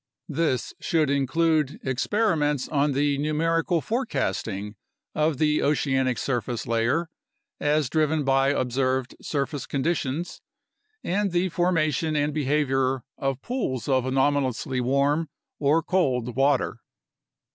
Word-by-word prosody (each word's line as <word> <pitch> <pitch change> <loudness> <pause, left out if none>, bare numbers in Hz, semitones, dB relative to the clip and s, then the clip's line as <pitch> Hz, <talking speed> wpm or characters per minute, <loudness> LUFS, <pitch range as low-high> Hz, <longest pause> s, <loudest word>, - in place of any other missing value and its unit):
This 150 -4 -1
should 155 -5 +1
include 150 +1 +1
experiments 150 - 0
on 145 -1 +1
the 140 +1 +1
numerical 165 +3 +1
forecasting 130 - -2 0.4
of 155 -1 +1
the 150 +1 +2
oceanic 130 -4 +1
surface 120 -1 -2
layer, 120 +9 0 0.5
as 150 -1 +1
driven 155 +2 +1
by 135 0 +3
observed 130 -1 0
surface 145 0 -3
conditions, 150 +2 -2 0.6
and 200 +2 0
the 180 +2 +1
forma 170 -3 +1
tion 155 +2 -1
and 145 0 +1
behavior 135 -3 +1 0.2
of 135 -1 -2
pools 225 - -2
of 130 -2 +2
anomalously 135 -1 +1
warm 140 +5 +1 0.3
or 150 +3 +3
cold 125 -10 0
water. 135 0 +2
145 Hz, 115 wpm, -25 LUFS, 130-160 Hz, 0.6 s, by